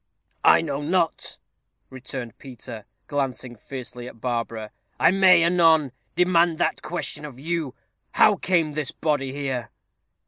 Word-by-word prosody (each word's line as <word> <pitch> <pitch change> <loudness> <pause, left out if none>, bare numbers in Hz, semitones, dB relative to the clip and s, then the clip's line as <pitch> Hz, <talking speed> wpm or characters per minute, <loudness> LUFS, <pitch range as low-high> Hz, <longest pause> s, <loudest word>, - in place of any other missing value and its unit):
"I - - +6
know 145 -3 -3
not," 165 +2 -1 0.5
returned 130 -3 -7
Peter, 120 -4 -9 0.2
glancing 130 -3 -3
fiercely 125 0 -7
at 115 - -12
Barbara; 115 -3 -3 0.3
"I - - +5
may, 185 -3 +6
anon, 165 -5 +4 0.2
demand 175 -2 +3
that - - 0
question 155 -2 -4
of 145 -4 -8
you. 160 -3 -3 0.4
How - - +5
came 165 -5 +1
this 150 -2 -2
body 145 -4 -1
here?" 135 -5 -3
145 Hz, 130 wpm, -24 LUFS, 125-165 Hz, 0.5 s, I